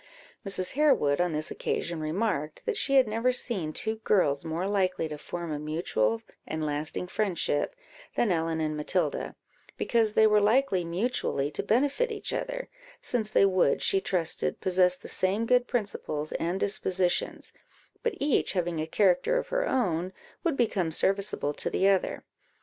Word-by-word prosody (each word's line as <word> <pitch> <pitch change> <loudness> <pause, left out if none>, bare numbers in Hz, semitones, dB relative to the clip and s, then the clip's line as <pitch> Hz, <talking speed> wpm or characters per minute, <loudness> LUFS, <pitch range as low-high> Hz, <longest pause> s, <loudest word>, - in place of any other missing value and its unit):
Mrs. 195 -2 -1
Harewood 255 - +3
on 180 -1 +1
this 155 0 -2
occasion 170 -1 -2
remarked, 155 -1 -2
that 465 -3 -1
she 275 -9 +1
had 260 -3 +6
never 230 +4 +1
seen 200 -10 -2
two 220 +7 -3
girls 175 -10 +2
more 165 +3 -2
likely 185 -4 0
to 155 - -6
form 170 0 -5
a 150 - -3
mutual 130 -8 -1 0.2
and 155 0 -3
lasting 150 +4 -2
friendship 185 - -1 0.4
than 230 - +2
Ellen 165 -1 0
and 155 -1 -1
Matilda, 185 - -1 0.4
because 225 -3 +2
they 220 - +6
were 210 -1 +5
likely 210 -3 +3
mutually 170 - -1
to - - -2
benefit 285 - +1
each 420 - -3
other, - - -3 0.3
since 220 -4 -1
they 195 - +5
would, 185 -7 +2
she 195 - +3
trusted, 175 -4 -1
possess 180 -1 +3
the - - -11
same 195 +5 +2
good 250 +1 +3
principles 175 -9 -3
and 175 +3 -2
dispositions, 185 -3 0 0.5
but 470 -3 -1
each 285 -1 +1
having 175 -3 -1
a 155 - -3
character 205 - +2
of - - -3
her - - 0
own, 185 -8 0 0.3
would 325 -5 0
become 195 -8 +1
serviceable 195 -3 +1
to - - 0
the 195 - +2
other. 195 -1 +1
190 Hz, 160 wpm, -28 LUFS, 160-230 Hz, 0.5 s, had